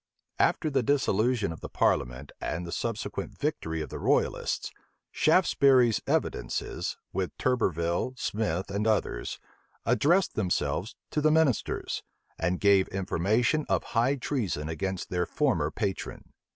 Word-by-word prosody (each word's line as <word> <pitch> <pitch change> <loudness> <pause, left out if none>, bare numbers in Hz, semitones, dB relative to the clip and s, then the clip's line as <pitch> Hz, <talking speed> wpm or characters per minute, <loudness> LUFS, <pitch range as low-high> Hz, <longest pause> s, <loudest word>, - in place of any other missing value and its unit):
After 155 - +2
the 135 -1 +2
dissolution 120 - +1
of 80 - -8
the - - -6
parliament, 65 +3 0
and 85 +2 -3
the 85 - -6
subsequent 115 +2 -4
victory 80 0 -2
of - - -8
the - - -6
royalists, - - 0 0.4
Shaftesbury's 135 - +4
evidences, - - -1 0.2
with 95 -1 -2
Turberville, 90 -1 0
Smith, 100 -5 -2
and 105 +2 0
others, 110 -1 0 0.5
addressed 175 +6 +3
themselves 90 - -1 0.2
to 150 - 0
the 155 - +4
ministers, 155 -6 +1 0.4
and 90 +2 0
gave 100 -2 +5
information 100 - +1
of - - +2
high 120 +4 +3
treason 110 - -2
against 95 +3 -3
their 90 -1 0
former 110 - +1
patron. 95 +4 -4
105 Hz, 125 wpm, -28 LUFS, 85-130 Hz, 0.5 s, gave